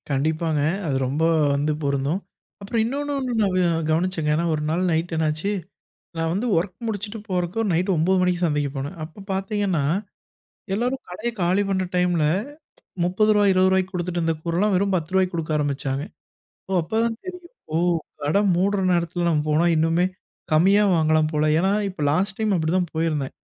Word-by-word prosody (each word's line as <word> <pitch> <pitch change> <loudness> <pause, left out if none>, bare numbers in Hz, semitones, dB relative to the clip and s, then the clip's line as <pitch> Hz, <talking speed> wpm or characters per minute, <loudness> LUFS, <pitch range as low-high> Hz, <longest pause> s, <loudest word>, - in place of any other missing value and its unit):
கண்டிப்பாங்க. 155 +2 0 0.3
அது 140 - 0
ரொம்ப 145 +5 -1 0.3
வந்து 145 +2 0
பொருந்தும். 140 +6 0 0.4
அப்புறம் 220 +3 -1
இன்னொன்னு 285 +4 -2
ஒண்ணு 255 -2 -2
நா 205 - +3 0.4
கவனிச்சேங்க. 165 -1 0
ஏனா 170 +2 0
ஒரு 150 - -3
நாள் 170 +3 0
நைட் 165 +2 -1
என்னாச்சு, 160 +4 0 0.7
நா 165 - 0
வந்து 210 +7 -1
ஒர்க் 180 +2 -1
முடிச்சுட்டு 210 0 -4
போறதுக்கு 180 +2 -1
நைட் 175 +4 +1
ஒன்பது 175 +4 +2
மணிக்கு 180 -1 +1
சந்தைக்கு 150 -3 0
போனேன். 140 +6 -4
அப்ப 160 +6 -10
பார்த்திங்கன்னா, 195 -4 -1 0.9
எல்லாரும் 245 +6 -1
கடைய 215 +7 -3
காலி 180 +3 +2
பண்ற 190 -1 +1
டைம்ல 175 -3 +2 0.8
30 195 +5 +2
ரூவாய் 205 -1 +4
20 185 0 +4
ரூவாய்க்கு 190 0 +1
குடுத்துட்டு 175 -1 -2
இருந்த 165 -1 0
கூறலாம், 180 +5 +1
வெறும் 195 +1 +1
10 165 -2 -3
ரூவாய்க்கு 185 -1 +2
குடுக்க 165 -1 -3
ஆரம்பிச்சாங்க. 140 -1 -2 0.7
"ஓ - - -2
அப்பதான் 225 +6 0
தெரியும். 360 -1 -7 0.3
ஓ - - +2 0.5
கட 150 +7 +2 0.2
மூடுற 195 +3 +1
நேரத்துல 175 0 0
நம்ம 155 -3 +2
போனா 155 +3 +3
இன்னுமே 165 +3 +2 0.5
கம்மியா 195 +7 +5
வாங்கலாம் 155 -1 +3
போல." 150 0 +1
ஏன்னா, 190 +3 +2 0.2
இப்ப 185 -5 -6
லாஸ்ட் 190 +6 0
டைம் 215 -2 +1
அப்படிதான் 170 +1 0
போயிருந்தேன். 155 -4 -1
175 Hz, 160 wpm, -23 LUFS, 155-195 Hz, 0.9 s, கம்மியா